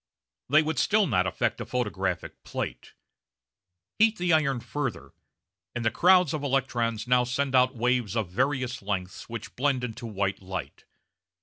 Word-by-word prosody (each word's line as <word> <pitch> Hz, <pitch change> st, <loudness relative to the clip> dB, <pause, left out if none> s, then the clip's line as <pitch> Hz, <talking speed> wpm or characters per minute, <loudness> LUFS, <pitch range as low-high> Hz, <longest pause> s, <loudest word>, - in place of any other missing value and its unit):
They 155 Hz, +3 st, +5 dB
would 155 Hz, -4 st, -1 dB
still 210 Hz, 0 st, +3 dB
not 95 Hz, -, +1 dB
affect -, -, -1 dB
a -, -, -4 dB
photographic 95 Hz, -7 st, -3 dB
plate. -, -, -5 dB, 1.1 s
Heat 220 Hz, 0 st, +4 dB
the 175 Hz, -1 st, +1 dB
iron 140 Hz, -5 st, +2 dB
further, 130 Hz, -, -4 dB, 0.6 s
and 120 Hz, -1 st, -3 dB
the 115 Hz, -, +3 dB
crowds 180 Hz, -, +5 dB
of 155 Hz, -, -2 dB
electrons 120 Hz, -5 st, 0 dB
now 125 Hz, 0 st, +4 dB
send 130 Hz, +2 st, -1 dB
out 130 Hz, +1 st, +4 dB
waves 120 Hz, -2 st, 0 dB
of 110 Hz, -4 st, 0 dB
various 130 Hz, +2 st, -1 dB
lengths 95 Hz, -1 st, -4 dB
which 115 Hz, -2 st, -7 dB
blend 135 Hz, -1 st, +1 dB
into 115 Hz, 0 st, -5 dB
white 100 Hz, -2 st, -2 dB
light. 95 Hz, -7 st, -6 dB
125 Hz, 150 wpm, -27 LUFS, 105-140 Hz, 1.1 s, They